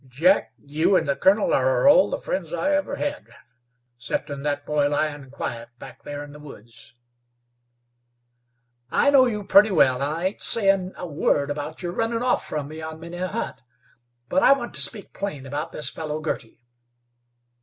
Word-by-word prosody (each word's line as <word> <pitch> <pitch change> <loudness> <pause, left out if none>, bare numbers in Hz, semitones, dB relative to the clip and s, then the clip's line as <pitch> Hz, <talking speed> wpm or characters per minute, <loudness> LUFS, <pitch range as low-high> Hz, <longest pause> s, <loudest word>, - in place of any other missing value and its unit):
"Jack, 165 +10 +2
you 155 +6 +1
an' 160 - 0
the 140 -1 0
colonel 200 +7 +3
are 130 - +3
all 285 - +6
the - - -2
friends - - -4
I 290 - 0
ever 290 0 0
hed, 290 0 -4 0.7
'ceptin' 140 +3 -3
that 145 0 -2
boy 145 -1 +1
lyin' 145 -2 -2
quiet 120 -3 -5
back - - -12
there 145 0 -6
in 145 - -11
the 150 - -12
woods." 120 -6 -12 1.9
"I 285 - +3
know 265 -2 +6
you 210 -3 -3
pretty 200 +2 +6
well, 135 -8 +3
and 155 +5 -2
ain't 190 - -2
sayin' 195 -4 +1
a - - -5
word 145 -2 0
about 150 +4 -5
your 175 - -2
runnin' 230 +4 -1
off 250 - +1
from 150 -2 -3
me 155 +1 -8
on 160 0 -7
many 170 +2 -8
a 185 +1 -2
hunt, 220 +5 -4 0.7
but 280 - +1
I - - +7
want 240 -3 -5
to - - -1
speak 210 -4 -2
plain 170 -9 -5
about 150 +4 -4
this 150 - -3
fellow 155 -1 -4
Girty." 150 -7 -5
160 Hz, 175 wpm, -24 LUFS, 145-200 Hz, 1.9 s, I